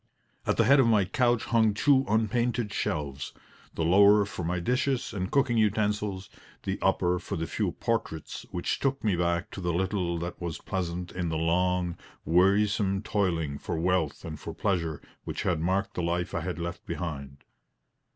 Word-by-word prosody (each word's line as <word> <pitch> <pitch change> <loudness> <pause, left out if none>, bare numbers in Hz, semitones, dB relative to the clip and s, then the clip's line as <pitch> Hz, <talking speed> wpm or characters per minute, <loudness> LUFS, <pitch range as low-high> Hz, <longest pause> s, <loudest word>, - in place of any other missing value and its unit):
At - - +1
the - - +5
head 140 +1 +6
of 130 - +5
my 105 -4 +4
couch 120 +3 +1
hung 110 -3 +2
two 135 +4 +4
unpainted 115 +1 +1
shelves 70 -2 -3 0.4
the 80 - 0
lower 100 +4 +6
for 95 -3 -6
my 90 +2 -1
dishes 125 +6 0
and 95 -2 -2
cooking 130 -4 +2
utensils, 105 -2 0 0.4
the - - -2
upper 90 0 +2
for - - -5
the 80 - -2
few 95 +2 -2
portraits 115 -9 -3
which 85 - -2
took 135 0 -1
me 105 -4 +2
back 85 0 0
to 95 - -7
the 90 -1 0
little 90 -1 -1
that 85 +2 -5
was 85 -3 -3
pleasant 90 -1 -4
in 90 -2 -2
the 80 - -1
long, 90 +1 +1 0.3
wearisome 100 +3 +3
toiling 85 -9 -1
for - - -3
wealth 85 -2 0
and 75 -2 -6
for - - -7
pleasure 85 -7 -1 0.2
which - - -4
had 85 -3 +1
marked 95 +4 0
the - - -2
life 85 +1 -1
I - - -1
had 90 0 -4
left 85 +1 -5
behind. 70 -5 -5
90 Hz, 175 wpm, -28 LUFS, 85-105 Hz, 0.4 s, head